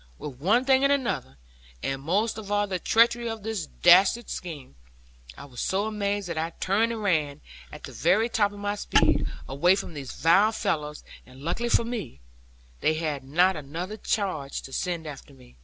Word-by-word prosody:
With 135 -4 -8
one 220 - +2
thing 265 0 +4
and 275 - +4
another, 240 - -1 0.5
and 135 0 -2
most 205 +10 0
of 205 -2 -8
all 205 0 +2
the 190 -3 -3
treachery 235 +4 +3
of 225 -2 -6
this 215 -7 -3
dastard 190 +7 +4
scheme, 155 - -7 0.6
I - - -9
was 125 -4 -8
so 195 +2 0
amazed 205 -2 -2
that 170 -2 -3
I 165 +1 -3
turned 215 +5 +1
and 225 -2 -4
ran, 155 -7 0 0.3
at - - -11
the - - -8
very 225 +2 +2
top 205 -3 +1
of 205 - -11
my 205 0 -2
speed, 205 - +2 0.2
away 145 +9 +3
from 195 -3 -5
these 140 -3 -7
vile 195 +7 +4
fellows; 155 -9 -2 0.2
and 130 +1 -16
luckily 230 +9 -1
for 235 - +3
me, 230 - -5 0.6
they 155 - +2
had 155 -4 -3
not 175 +8 +3
another 165 +7 -5
charge 185 -11 -2
to 135 - -11
send 170 0 -2
after 145 -1 -10
me. 125 -2 -19
185 Hz, 190 wpm, -26 LUFS, 150-215 Hz, 0.6 s, thing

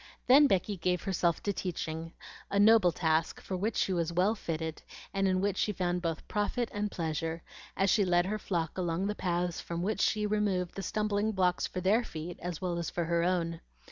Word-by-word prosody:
Then 280 +3 +7
Becky 195 -2 0
gave 180 0 0
herself 175 -3 0
to 200 - 0
teaching, 165 -3 -4 0.4
a 200 - -1
noble 205 -3 +6
task, 160 -1 0
for 190 - -5
which 205 +4 -1
she 190 - +1
was 170 -2 0
well 185 +5 +2
fitted, 160 -6 -4 0.3
and 195 0 +1
in 185 0 +2
which 200 -1 0
she 210 - +1
found 180 -1 -1
both 165 -2 -3
profit 220 +3 -1
and 205 0 -1
pleasure, 165 -1 -3 0.3
as 195 0 +3
she 210 - +4
led 175 -1 +3
her 215 +3 -2
flock 170 -3 -2
along 175 +1 -1
the 205 - 0
paths 175 -3 -1
from 170 0 -4
which 210 +3 -1
she 210 -1 +2
removed 205 -4 0
the 195 - -5
stumbling 210 +2 0
blocks 180 -2 +1
for 185 - -5
their 210 +6 +3
feet, 165 -4 -7
as 175 -2 -4
well 175 -2 -2
as 170 - -2
for 175 - -2
her 170 +1 +1
own. 170 -2 0
180 Hz, 205 wpm, -31 LUFS, 170-205 Hz, 0.4 s, Then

